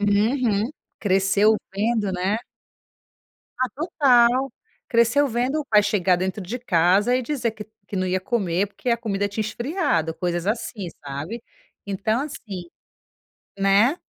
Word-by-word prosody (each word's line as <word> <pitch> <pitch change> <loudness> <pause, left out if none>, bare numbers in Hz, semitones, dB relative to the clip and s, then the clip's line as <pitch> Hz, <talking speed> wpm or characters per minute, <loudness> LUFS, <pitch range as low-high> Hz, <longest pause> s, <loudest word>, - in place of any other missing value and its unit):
Uhum. 215 +2 +2 0.3
Cresceu 200 +2 +3 0.2
vendo, 215 0 0
né. 190 +4 -1 1.2
Ah, 255 0 +1
total. 260 -4 +3 0.4
Cresceu 235 +5 +3
vendo 255 +5 0
o - - -5
pai 210 -5 +4
chegar 195 -4 +2
dentro 190 +3 -3
de 215 +8 -5
casa, 200 +1 +3
e 255 - -1
dizer 250 -3 -1
que 210 -1 -9 0.2
que 200 - -5
não 185 0 0
ia 185 +1 0
comer, 195 -2 0
porque 205 - -7
a 235 - +3
comida 205 -3 -1
tinha 205 +2 -2
esfriado, 215 - -1
coisas 175 0 -2
assim, 210 -3 -2 0.2
sabe. 145 +12 -5 0.4
Então 205 +4 -1
assim, 205 -11 -6 0.9
né, 200 - +4
210 Hz, 135 wpm, -23 LUFS, 190-240 Hz, 1.2 s, pai